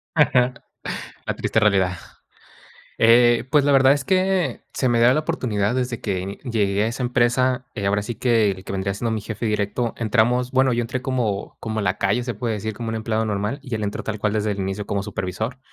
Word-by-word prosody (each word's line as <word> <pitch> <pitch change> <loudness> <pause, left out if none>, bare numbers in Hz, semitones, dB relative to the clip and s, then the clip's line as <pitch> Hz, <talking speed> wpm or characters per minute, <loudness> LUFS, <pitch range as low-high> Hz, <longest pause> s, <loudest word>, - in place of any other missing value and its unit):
Ajá, 125 -5 +3 0.7
la - - -1
triste - - 0
realidad. 95 -4 +2 1.0
Eh, 120 +1 +5
pues, 150 -1 +5
la 145 - +3
verdad 135 0 +6
es 145 - -2
que, 185 +2 +1
se 130 - 0
me 120 -1 +2
da 120 +2 +6
la 155 - +1
oportunidad 110 -7 -1
desde 125 -2 -2
que 95 -1 -3
llegué 105 -5 0
a 110 - +1
esa 125 +3 -3
empresa, 125 +1 +1
eh, 100 - -3
ahora 100 +1 +1
sí 110 +3 -5
que, 115 -4 +2
el 95 -1 -8
que - - -7
vendría 95 0 -2
siendo 115 +3 -2
mi 110 -1 -2
jefe 110 +2 -5
directo 105 +2 -1
entramos, 120 +2 +1
bueno, 130 -1 +3
yo 120 - +1
entré 120 +2 -3
como 120 -7 -2
como 110 -1 -3
lacayo, 100 +4 0
se 120 0 -3
puede 115 +1 -2
decir, 110 +1 -4
como 115 +2 -5
un 110 - -2
empleado 110 0 -1
normal, 105 +6 -2
y 125 - -8
él 110 - -3
entró, 100 0 -3
tal 110 -1 -4
cual, 105 0 0
desde 105 -1 0
el 100 - -4
inicio, 95 +2 -3
como 100 -1 -1
supervisor, 105 +5 -4
115 Hz, 215 wpm, -22 LUFS, 105-125 Hz, 1.0 s, verdad